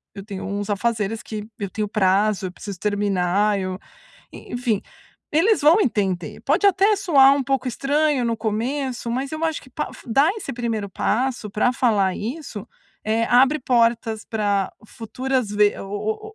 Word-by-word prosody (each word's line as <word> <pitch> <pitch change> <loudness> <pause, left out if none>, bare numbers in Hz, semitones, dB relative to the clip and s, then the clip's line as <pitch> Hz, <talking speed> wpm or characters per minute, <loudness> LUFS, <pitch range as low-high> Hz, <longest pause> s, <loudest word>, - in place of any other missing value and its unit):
eu 195 -1 -8
tenho 200 -3 -6
uns 200 0 -3
afazeres 215 0 -1
que 215 -1 -6
eu 200 -2 -3
tenho 210 +2 -3
prazo, 200 0 +2
eu - - -7
preciso 195 0 -8
terminar. 205 0 +1
Eu", 185 -1 -3 0.6
e - - -11
enfim, 240 -4 0 0.5
eles 380 +8 +3
vão 320 +8 +6
entender. 195 - -1
Pode 405 - +2
até 400 +2 +4
soar 280 -9 +5
um 280 - 0
pouco 265 -1 0
estranho 285 +1 +1
no 230 -1 0
começo, 235 +3 -2
mas 265 +3 -2
eu 310 +1 -4
acho 320 -2 -1
que 260 - -17
pa - - -4 0.2
dar 275 +7 +3
esse 420 -10 -6
primeiro 230 -4 -3
passo 240 +2 -1
pra 215 +5 +1
falar 210 -7 +2
isso, 235 -2 -6 0.4
eh, 225 +1 +1
abre 265 +6 +4
portas 230 -3 +1
pra 205 -3 0 0.2
futuras 250 +2 -3
ve 210 0 +3
o 215 - -4
225 Hz, 160 wpm, -22 LUFS, 205-270 Hz, 0.6 s, vão